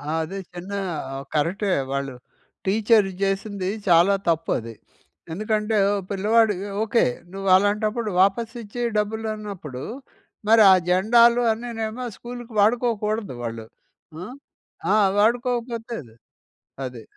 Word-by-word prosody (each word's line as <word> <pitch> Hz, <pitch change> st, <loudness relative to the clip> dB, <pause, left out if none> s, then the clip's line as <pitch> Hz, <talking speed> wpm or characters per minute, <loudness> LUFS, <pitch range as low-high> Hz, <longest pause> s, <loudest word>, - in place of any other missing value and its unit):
అదే. 160 Hz, +4 st, -3 dB, 0.2 s
చిన్న 180 Hz, +3 st, -8 dB, 0.4 s
ఆ! -, -, -5 dB, 0.2 s
కరెక్టే 185 Hz, +7 st, 0 dB, 0.2 s
వాళ్ళు 140 Hz, -1 st, -2 dB, 0.5 s
టీచర్ 215 Hz, +1 st, +3 dB
జేసింది 195 Hz, -1 st, -1 dB, 0.2 s
చాలా 175 Hz, +3 st, +5 dB, 0.2 s
తప్పది. 155 Hz, -8 st, -1 dB, 0.6 s
ఎందుకంటే 215 Hz, +3 st, 0 dB, 0.3 s
పిల్లవాడు 210 Hz, +2 st, +3 dB, 0.3 s
ఓకే. 225 Hz, +1 st, +2 dB, 0.3 s
నువ్వలాంటప్పుడు 205 Hz, +4 st, +2 dB
వాపసిచ్చి 225 Hz, +3 st, 0 dB, 0.2 s
డబ్బులన్నప్పుడు 210 Hz, -, -4 dB, 0.6 s
మరి 225 Hz, +1 st, +6 dB
ఆ -, -, +9 dB, 0.2 s
జెండాలు 235 Hz, +6 st, +5 dB
అన్నీనేమో 225 Hz, +1 st, -4 dB
స్కూల్‌కి 240 Hz, 0 st, -9 dB
వాడుకోకూడదు 215 Hz, -, +1 dB
వాళ్ళు. 115 Hz, -1 st, -5 dB, 0.6 s
ఆ! -, -, -5 dB, 0.7 s
ఆ! -, -, +5 dB, 0.2 s
వాడుకోకపోతది 235 Hz, -, -1 dB, 0.7 s
అది. 125 Hz, -3 st, -8 dB
210 Hz, 90 wpm, -23 LUFS, 185-225 Hz, 0.7 s, ఆ